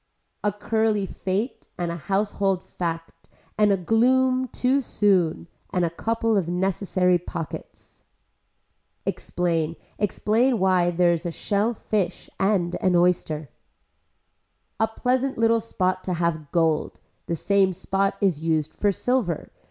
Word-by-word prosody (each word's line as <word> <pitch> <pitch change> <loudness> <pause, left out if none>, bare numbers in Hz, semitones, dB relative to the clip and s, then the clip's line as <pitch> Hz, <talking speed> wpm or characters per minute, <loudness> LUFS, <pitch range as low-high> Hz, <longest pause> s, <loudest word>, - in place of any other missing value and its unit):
A 210 - +2
curly 215 0 0
fate 195 +6 -3
and 175 -1 -2
a - - -3
household 195 +1 0
fact 165 -1 -5 0.3
and 210 -1 +4
a 195 - +3
gloom 255 +7 +3
too 255 +3 +1
soon, 185 - +1 0.2
and 180 -2 +1
a 165 - -2
couple 225 +4 0
of 190 -5 +1
necessary 180 0 +1
pockets. 165 -2 -8 1.0
Explain, 165 -2 -1 0.2
explain 225 +5 +2
why 185 -2 +3
there 175 0 +3
is 170 +1 -3
a - - -2
shell 210 +7 0
fish 195 -4 -2
and 190 -3 +1
an 185 -1 +3
oyster. 170 -4 +1 1.3
A 220 - +3
pleasant 255 +4 0
little 230 0 +3
spot 185 -4 -1
to 185 - -1
have 165 -3 -1
gold. 165 -3 +1 0.3
The 170 - -1
same 195 +3 +2
spot 195 +2 -1
is 180 -7 +1
used 160 -2 0
for 205 - +1
silver. 215 - -1
190 Hz, 130 wpm, -24 LUFS, 170-215 Hz, 1.3 s, and